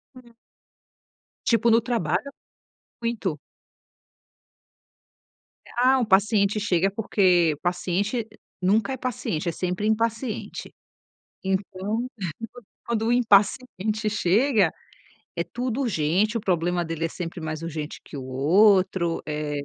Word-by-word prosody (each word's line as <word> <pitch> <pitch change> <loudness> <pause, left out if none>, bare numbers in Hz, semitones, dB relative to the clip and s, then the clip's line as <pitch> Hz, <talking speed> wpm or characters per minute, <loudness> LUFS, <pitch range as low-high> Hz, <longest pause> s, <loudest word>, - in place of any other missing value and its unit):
Hum. 240 -2 -16 1.1
Tipo 230 0 +3
no 230 +1 +5
trabalho, 220 - -1 0.7
muito. 210 -10 -2 2.3
Eh, - - -16
ah, 260 +2 +4
um 240 - +1
paciente 200 +1 +3
chega, 195 -1 +1
porque 180 -6 +3
o - - -23
paciente 200 +6 -1 0.3
nunca 215 +8 +2
é - - -4
paciente, 195 -9 -2
é - - -1
sempre 180 +5 -2
impaciente. 225 +1 -2 0.7
Então, 195 +4 -2 0.8
quando 225 -1 -1
o 235 - +2
impaciente 215 -1 +2
chega, 205 - +3 0.7
é - - +1
tudo 250 +1 -3
urgente, 205 - +1
o 230 - 0
problema 175 -2 0
dele 165 0 -2
é - - -4
sempre 170 0 -6
mais 155 0 -4
urgente 155 -2 -5
que - - -10
o 130 - -6
outro. 180 +5 +3
Eh, 150 -1 -3
200 Hz, 115 wpm, -25 LUFS, 170-230 Hz, 2.3 s, no